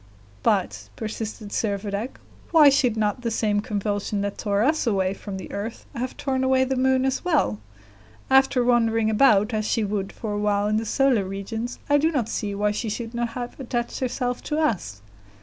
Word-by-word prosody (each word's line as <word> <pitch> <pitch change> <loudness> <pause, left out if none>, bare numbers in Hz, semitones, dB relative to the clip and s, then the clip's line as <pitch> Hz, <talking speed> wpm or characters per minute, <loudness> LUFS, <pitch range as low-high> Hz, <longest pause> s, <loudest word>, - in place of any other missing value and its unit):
"But," 105 - 0
persisted 220 -1 -5
Servadac, 205 +2 -2 0.3
"why 310 -4 +7
should 255 -5 +2
not 215 +2 0
the 235 - -1
same 210 -2 +1
convulsion 205 -1 -2
that 200 0 -2
tore 205 0 +1
us 305 0 +1
away 190 -3 +1
from 195 0 -7
the 190 - -8
earth 210 +3 -5
have 250 +2 -4
torn 265 -2 -1
away 260 0 +3
the 265 0 -1
moon 260 0 +2
as 265 0 -1
well? 300 - +1 0.7
After 265 -1 +4
wandering 225 -2 +3
about 215 -2 +4
as 215 -1 0
she 225 +1 +1
would 200 -1 -2
for 215 -2 -5
a 205 - -1
while 205 -1 +1
in 215 0 +1
the 225 - -1
solar 260 -5 +2
regions, 220 +5 -5
I 290 0 +4
do 320 +3 +2
not 245 -8 -1
see 205 -3 -3
why 210 +1 +1
she 220 +2 -3
should 225 +2 -4
not 235 0 -1
have 245 +2 -6
attached 240 -2 -3
herself 250 -1 -2
to 300 - -1
us." 140 - -1
225 Hz, 190 wpm, -24 LUFS, 205-255 Hz, 0.7 s, why